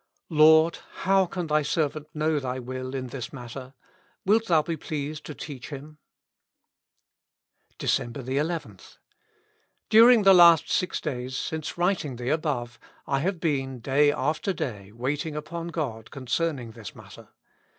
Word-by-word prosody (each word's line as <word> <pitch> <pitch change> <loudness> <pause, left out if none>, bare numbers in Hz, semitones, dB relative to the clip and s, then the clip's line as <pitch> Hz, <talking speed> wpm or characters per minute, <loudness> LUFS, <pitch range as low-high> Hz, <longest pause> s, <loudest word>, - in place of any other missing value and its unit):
" - - -60
Lord! 160 +1 +5 0.3
how 190 -1 +4
can 180 0 -4
Thy 155 -1 +2
servant 150 0 -1
know 155 0 +1
Thy 130 -2 -4
will 130 +1 -6
in 130 -1 -4
this 125 -2 -6
matter? 130 +1 -9 0.5
Wilt 220 +3 +3
Thou 160 -3 +4
be 165 +1 -3
pleased 150 -1 -5
to 150 - -7
teach 135 -5 -8
him? 150 +1 -9 1.2
" - - -45
Decejnber 120 +3 -1
11.— 150 +6 -4 0.9
During 230 0 +7
the 195 0 +8
last 170 -3 +7
six 180 - 0
days, 130 -3 -4
since 160 +4 -4
writing 175 -7 0
the 120 +1 -4
above, 135 -6 -2 0.3
I 135 - 0
have 180 +4 -1
been, 135 -5 -1
day 140 +4 +3
after 155 - -1
day, 105 - -5
waiting 140 +7 -3
upon 170 +2 -5
God 135 -10 -4
concern 140 +4 -1
ing 120 -3 -8
this 110 -3 -10
matter. - - -14
150 Hz, 150 wpm, -26 LUFS, 130-165 Hz, 1.2 s, the